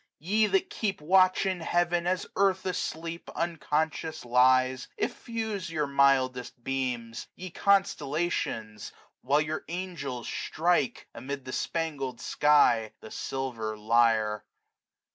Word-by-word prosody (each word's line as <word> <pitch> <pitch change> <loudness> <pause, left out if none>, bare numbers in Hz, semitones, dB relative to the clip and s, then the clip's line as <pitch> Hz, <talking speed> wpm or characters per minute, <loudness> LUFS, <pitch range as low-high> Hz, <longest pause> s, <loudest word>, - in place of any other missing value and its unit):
Ye 210 +7 +2
that 380 - +1
keep 205 -3 -2
watch 185 +4 +4
in 190 -2 0
heaven, 175 +1 +1
as 185 0 0
earth 190 -1 +2
asleep 170 -2 -4
Unconscious 160 -2 -2
lies, 130 +1 +3
effuse 220 -6 -3
your 155 -2 -1
mildest 130 -3 +2
beams. 125 -3 -3
Ye 185 -1 -8
constellations, 155 - 0 0.3
while 145 +3 +2
your 155 +1 -3
angels 165 -9 -5
strike. 165 -4 0
Amid 140 +1 -6
the 130 - -6
spangled 145 -7 -2
sky, 120 -7 +3
the 110 - -11
silver 115 -5 -4
lyre. 110 -1 +2
150 Hz, 110 wpm, -28 LUFS, 125-175 Hz, 0.3 s, watch